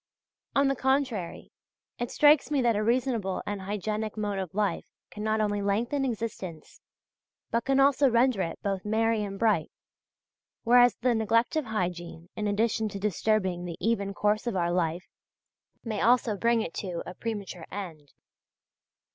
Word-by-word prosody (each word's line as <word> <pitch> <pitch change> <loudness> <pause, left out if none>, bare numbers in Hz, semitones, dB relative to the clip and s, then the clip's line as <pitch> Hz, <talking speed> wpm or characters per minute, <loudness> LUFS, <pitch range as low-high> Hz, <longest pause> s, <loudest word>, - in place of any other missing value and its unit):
On 275 0 +4
the 275 - +1
contrary, 260 -9 -1 0.5
it 240 0 -2
strikes 295 -1 +5
me 290 -2 +1
that 235 -2 +3
a 210 - 0
reasonable 230 -5 0
and 205 -1 -4
hygienic 210 +2 -3
mode 205 -2 -2
of 185 -2 -5
life 210 -1 0 0.3
can 210 - -8
not 220 0 +1
only 205 -1 0
lengthen 235 +8 0
existence 215 -9 -5 0.7
but 230 0 0
can 270 0 +2
also 275 0 +5
render 235 -3 +3
it 165 - -3
both 195 -2 -2
merry 225 +1 +1
and 195 -1 -5
bright, 210 -7 +2 0.9
whereas 245 +1 +6
the 250 0 +1
neglect 230 +3 +1
of 310 -3 0
hygiene 175 -5 -4
in 210 -1 -2
addition 220 +1 0
to 200 - -6
disturbing 195 -2 0
the 170 -2 -6
even 205 -3 0
course 210 +3 +1
of 235 - -1
our 175 -1 +1
life 175 0 -1 0.8
may 220 -3 -3
also 235 -1 +3
bring 230 +2 +2
it 165 - -6
to 180 -4 -4
a - - -7
premature 200 -6 -6
end. 165 -8 -7
215 Hz, 160 wpm, -28 LUFS, 195-235 Hz, 0.9 s, whereas